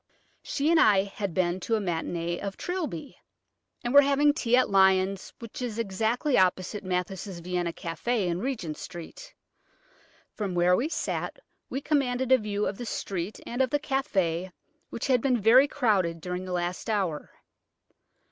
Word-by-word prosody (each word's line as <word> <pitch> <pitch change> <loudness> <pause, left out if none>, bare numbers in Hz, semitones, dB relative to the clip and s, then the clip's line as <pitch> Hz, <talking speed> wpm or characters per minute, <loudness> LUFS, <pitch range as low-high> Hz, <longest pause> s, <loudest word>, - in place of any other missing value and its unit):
She 295 +4 0
and 335 - +5
I 200 -3 +5
had 200 -1 -4
been 180 0 +1
to 225 +5 0
a - - +1
matinée 170 -2 -2
of 200 -1 -5
"Trilby," 345 - -4 0.7
and 240 - -2
were 285 - +10
having 285 +1 +3
tea 245 -5 +2
at 255 - +4
Lyons', 190 0 +3
which 230 +1 -9
is 235 -3 -3
exactly 230 +6 +1
opposite 185 +2 +1
Mathis' 185 +1 -3
Vienna 175 0 -2
café 185 +7 -2
in 175 0 -1
Regent 200 - -3
Street. 175 - -9 1.0
From 200 -4 -3
where 175 +1 +4
we 265 +10 0
sat - - -3 0.3
we 270 - -3
commanded 260 -3 0
a 260 - +7
view 210 -1 -2
of 195 - -3
the 240 - -4
street 190 -1 -4
and 245 +2 -2
of 260 - +2
the 290 - +1
café, 190 - -1 0.4
which - - -4
had 255 -3 +3
been 255 -2 +2
very 240 +7 +6
crowded 195 - +1
during 180 +2 -4
the 185 - -6
last 180 +4 -2
hour. 190 -8 -1
200 Hz, 165 wpm, -27 LUFS, 180-250 Hz, 1.0 s, were